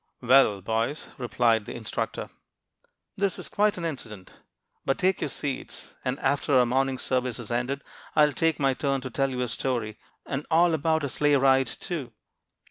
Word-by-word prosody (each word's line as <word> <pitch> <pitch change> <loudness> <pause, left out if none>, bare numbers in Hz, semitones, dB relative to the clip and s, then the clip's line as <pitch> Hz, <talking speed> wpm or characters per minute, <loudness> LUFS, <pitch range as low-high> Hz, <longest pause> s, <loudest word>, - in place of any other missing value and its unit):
"Well, 120 -5 +5
boys," 115 +8 -1
replied 115 -2 +2
the - - -7
instructor, - - -4 0.9
"that 200 -1 0
is - - -6
quite 210 -1 +2
an 170 - -4
incident. 110 - -6 0.5
But 135 - 0
take 190 +1 +1
your - - -1
seats; 140 -3 -4
and 130 +1 -1
after 140 0 +2
our 125 - +5
morning 130 +2 +1
service 130 -1 -1
is 120 -2 -7
ended, 125 +4 -1 0.3
I 150 - +7
will 150 - -1
take 165 +3 +1
my 135 -2 +3
turn 135 0 -1
and 130 -3 -6
tell 135 -1 +1
you 125 -1 -3
a 125 - 0
story, 115 -1 -2 0.3
and 140 +1 -3
all 170 +1 +4
about 160 0 +1
a - - 0
sleigh 145 +3 +2
ride, 135 -1 +4
too." 145 -11 -5
135 Hz, 180 wpm, -27 LUFS, 125-150 Hz, 0.9 s, I